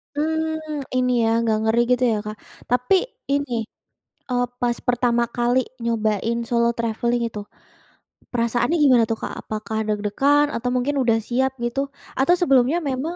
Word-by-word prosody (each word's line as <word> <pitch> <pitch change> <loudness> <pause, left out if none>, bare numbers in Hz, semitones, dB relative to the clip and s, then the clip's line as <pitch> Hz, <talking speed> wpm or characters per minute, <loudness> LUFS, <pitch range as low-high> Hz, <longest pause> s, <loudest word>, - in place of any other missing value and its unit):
Mmm. 315 -1 -2
Ini 250 0 +2
ya, 225 - +2
agak 225 -2 +1
ngeri 220 +1 +2
gitu 250 0 +3
ya 215 - +1
Kak. 215 0 -5 0.3
Tapi 250 +9 +3 0.4
ini, 250 -6 -1 0.7
eee, 245 0 +2 0.2
pas 240 -1 +1
pertama 240 -1 +2
kali 240 +2 +2 0.2
nyobain 225 0 0
solo 235 0 +2
traveling 235 +1 0
itu, 210 - -7 0.9
perasaannya 240 +6 +1
gimana 250 -4 +6
tuh 225 - -1
Kak, - - -4
apakah 215 0 -5
deg-degan 215 +8 +2
atau 245 +2 -2
mungkin 270 +4 0
udah 230 -2 +3
siap 260 +2 +1
gitu, 240 +3 -2 0.4
atau 275 +6 +4
sebelumnya 270 0 +4
memang 280 +7 -3
245 Hz, 145 wpm, -22 LUFS, 230-270 Hz, 0.9 s, gimana